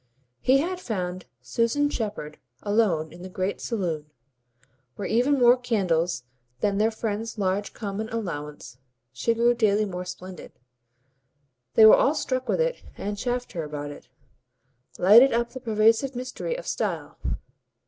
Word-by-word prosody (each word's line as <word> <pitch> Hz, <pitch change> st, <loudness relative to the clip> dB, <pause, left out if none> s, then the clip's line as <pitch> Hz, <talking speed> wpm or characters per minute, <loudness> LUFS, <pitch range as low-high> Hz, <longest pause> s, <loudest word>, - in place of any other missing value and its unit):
He 260 Hz, -, +4 dB
had 355 Hz, +6 st, -1 dB
found 185 Hz, -, -4 dB, 0.2 s
Susan 235 Hz, -, +1 dB
Shepherd 205 Hz, -, -4 dB, 0.2 s
alone 195 Hz, -8 st, +1 dB
in 175 Hz, -, -12 dB
the 185 Hz, -, -8 dB
great 185 Hz, +2 st, -3 dB
saloon, 170 Hz, -10 st, -3 dB, 0.9 s
where 195 Hz, -, -4 dB
even 255 Hz, +5 st, +2 dB
more 245 Hz, -1 st, +6 dB
candles 180 Hz, -, 0 dB, 0.4 s
than 200 Hz, +4 st, 0 dB
their 220 Hz, +1 st, +4 dB
friend's 225 Hz, 0 st, -4 dB
large 200 Hz, 0 st, -1 dB
common 215 Hz, 0 st, -4 dB
allowance 150 Hz, -, -6 dB, 0.3 s
she 230 Hz, -, 0 dB
grew 235 Hz, +1 st, +4 dB
daily 215 Hz, -3 st, +2 dB
more 180 Hz, -2 st, -5 dB
splendid; 185 Hz, 0 st, -9 dB, 1.2 s
they 220 Hz, -, +8 dB
were 220 Hz, -, +10 dB
all 290 Hz, -, +3 dB
struck 255 Hz, -3 st, -2 dB
with -, -, +1 dB
it -, -, 0 dB, 0.2 s
and 205 Hz, +1 st, -3 dB
chaffed 245 Hz, +3 st, -3 dB
her 165 Hz, -, -4 dB
about 145 Hz, -1 st, -5 dB
it -, -, -13 dB, 0.9 s
lighted 230 Hz, +8 st, +7 dB
up 235 Hz, 0 st, 0 dB
the 260 Hz, -, -7 dB
pervasive 225 Hz, +3 st, +2 dB
mystery 255 Hz, -, -4 dB
of -, -, -8 dB
Style. -, -, -3 dB
215 Hz, 145 wpm, -25 LUFS, 180-240 Hz, 1.2 s, were